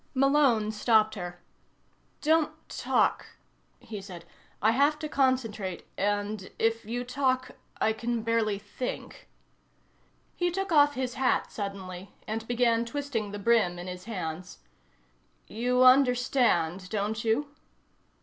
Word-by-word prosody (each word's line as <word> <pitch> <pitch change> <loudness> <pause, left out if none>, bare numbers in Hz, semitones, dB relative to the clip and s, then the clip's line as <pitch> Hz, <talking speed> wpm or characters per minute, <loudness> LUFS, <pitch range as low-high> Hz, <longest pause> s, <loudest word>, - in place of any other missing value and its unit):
Malone 265 -5 +3
stopped 220 0 +3
her. 175 -3 -7 0.8
"Don't 310 0 +3 0.2
talk," - - 0 0.4
he 210 -3 -8
said. 180 -3 -10 0.3
"I 220 - +4
have 285 +5 +3
to 305 0 -4
concentrate 230 - 0
and 205 0 -1
if 225 0 +1
you 240 +3 -3
talk 255 0 0 0.3
I 220 - +2
can 235 0 -2
barely 225 -3 +1
think." 205 +5 -7 1.1
He 355 0 +1
took 385 +2 -3
off 290 -2 +5
his 255 -1 -2
hat 260 +1 +1
suddenly, 195 -2 -6
and 220 +1 -4
began 235 -1 +2
twisting 235 -4 -3
the 205 - -5
brim 205 -4 +2
in 175 - -7
his 180 0 -7
hands. 180 -4 -5 0.9
"You 250 +3 +1
understand, 250 -9 +3
don't 215 +2 -2
you?" 230 +6 +1
225 Hz, 120 wpm, -28 LUFS, 205-255 Hz, 1.1 s, off